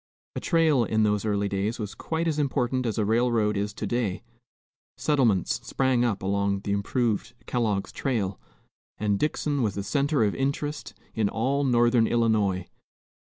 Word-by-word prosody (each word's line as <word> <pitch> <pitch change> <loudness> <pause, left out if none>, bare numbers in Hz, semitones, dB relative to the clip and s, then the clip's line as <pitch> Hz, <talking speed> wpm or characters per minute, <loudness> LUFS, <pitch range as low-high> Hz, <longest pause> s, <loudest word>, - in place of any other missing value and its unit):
A - - -2
trail 160 -7 +3
in 110 -1 +1
those 105 0 +1
early 100 -1 0
days 100 +4 -1
was 105 -3 -5
quite 165 +1 -3
as 155 -2 0
important 130 -3 0
as 110 - -2
a 110 - +1
railroad 110 -1 +2
is 100 +1 -1
to - - -4
day; 110 -2 -1 0.7
settlements 120 - +2
sprang 130 -2 +1
up 105 -5 -1
along 100 0 0
the 100 - -3
improved 115 +3 -1
"Kellogg's 110 -5 -1
trail," 105 -8 -2 0.6
and 105 -2 0
Dixon 150 -2 0
was 105 -5 0
the 100 - -3
centre 140 +5 +1
of 105 - +1
interest 145 +2 -3 0.2
in 110 -2 +1
all 135 +7 0
northern 120 -3 +3
Illinois. 105 -6 +1
115 Hz, 160 wpm, -26 LUFS, 100-130 Hz, 0.7 s, trail